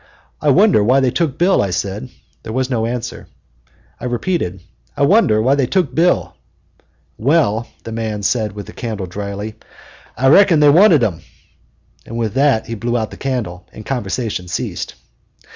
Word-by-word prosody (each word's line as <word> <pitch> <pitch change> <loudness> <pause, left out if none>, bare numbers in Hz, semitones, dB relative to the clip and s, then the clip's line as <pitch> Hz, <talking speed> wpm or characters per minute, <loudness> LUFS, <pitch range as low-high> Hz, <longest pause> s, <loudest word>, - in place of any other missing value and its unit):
"I - - +2
wonder 105 - +5
why 130 +6 +4
they 130 -2 +2
took 155 -1 -1
Bill," 180 +3 +3
I 100 - -1
said. 100 +6 -3 0.3
There - - -7
was 130 +1 -1
no 115 -2 0
answer, 120 0 -5 0.4
and - - -35 0.2
I - - -7
repeated, 120 - -2 0.4
"I - - +1
wonder 155 - +4
why 130 +3 +3
they 140 -3 +1
took 170 -5 0
Bill." 175 +4 +1 0.8
"Well," 120 -4 +2
said - - -28
the 115 - -7
man 110 -2 -3 0.3
with 100 -1 -7
the - - -12
candle, 110 -5 -4
dryly, 100 +3 -6 0.6
"I 135 +1 +3
reckon 175 0 +6
they 150 -1 +6
wanted 165 - +6
him," 90 -8 -1 0.8
and 115 - -7
with 115 -3 -2
that 135 -3 +2
he 115 - -6
blew 120 +2 -1
out 110 -2 -3
the - - -10
candle 115 -10 -4
and 110 - -11
conversation 110 -6 -3
ceased. 90 - -4
120 Hz, 175 wpm, -18 LUFS, 105-140 Hz, 0.8 s, reckon